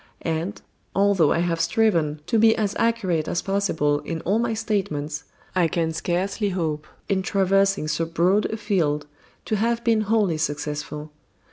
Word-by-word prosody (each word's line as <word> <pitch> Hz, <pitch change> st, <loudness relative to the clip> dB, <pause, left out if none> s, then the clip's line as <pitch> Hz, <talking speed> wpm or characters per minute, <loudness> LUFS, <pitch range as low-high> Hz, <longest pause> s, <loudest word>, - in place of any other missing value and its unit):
And, 165 Hz, +4 st, -2 dB, 0.4 s
although 195 Hz, -6 st, +4 dB
I 170 Hz, -, +2 dB
have 165 Hz, -1 st, 0 dB
striven 165 Hz, -7 st, +1 dB
to 220 Hz, +6 st, +1 dB
be 225 Hz, 0 st, +6 dB
as 210 Hz, -2 st, -1 dB
accurate 190 Hz, -9 st, +1 dB
as 175 Hz, -, -1 dB
possible 165 Hz, -7 st, +1 dB
in 165 Hz, +1 st, -5 dB
all 200 Hz, +5 st, +1 dB
my 230 Hz, -1 st, 0 dB
statements, 170 Hz, -10 st, -2 dB, 0.3 s
I 180 Hz, -2 st, +4 dB
can 165 Hz, 0 st, -1 dB
scarcely 190 Hz, +5 st, -1 dB
hope, 155 Hz, -5 st, -2 dB, 0.2 s
in 195 Hz, -2 st, +1 dB
traversing 195 Hz, -2 st, +2 dB
so 155 Hz, +2 st, 0 dB
broad 180 Hz, +5 st, +2 dB
a 220 Hz, -, -2 dB
field, 165 Hz, -9 st, 0 dB, 0.4 s
to 215 Hz, -, 0 dB
have 235 Hz, +2 st, 0 dB
been 225 Hz, -2 st, +3 dB
wholly 205 Hz, -6 st, +1 dB
successful. 150 Hz, 0 st, -3 dB
180 Hz, 155 wpm, -24 LUFS, 155-210 Hz, 0.4 s, be